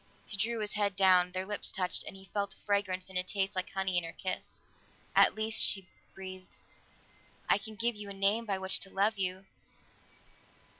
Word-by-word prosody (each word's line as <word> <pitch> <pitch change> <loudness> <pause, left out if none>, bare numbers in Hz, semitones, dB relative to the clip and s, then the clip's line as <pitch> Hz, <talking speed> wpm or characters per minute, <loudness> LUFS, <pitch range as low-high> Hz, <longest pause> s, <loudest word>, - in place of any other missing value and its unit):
She - - -6
drew 225 +3 0
his 210 0 -1
head 205 -2 0
down; 185 -2 +5
their 185 +1 -3
lips 205 +1 0
touched, 180 -1 -1
and - - -8
he 190 0 -13
felt 200 -1 -2
a - - -24
fragrance 200 -3 0
and 190 -1 0
a - - +1
taste 195 +1 -2
like 185 0 -2
honey 190 -2 0
in - - -8
her 165 - -6
kiss. 185 -2 -4 0.6
"At - - +6
least," 220 0 +1
she 195 -2 +4 0.3
breathed. 185 -1 -9 0.9
"I - - +4
can 215 +2 -9
give 235 +2 0
you 210 -1 -8
a - - -5
name 200 +4 +1
by 195 -2 0
which 190 0 +5
to 195 - +1
love 200 +2 +1
you. 185 0 -2
195 Hz, 200 wpm, -31 LUFS, 185-205 Hz, 0.9 s, At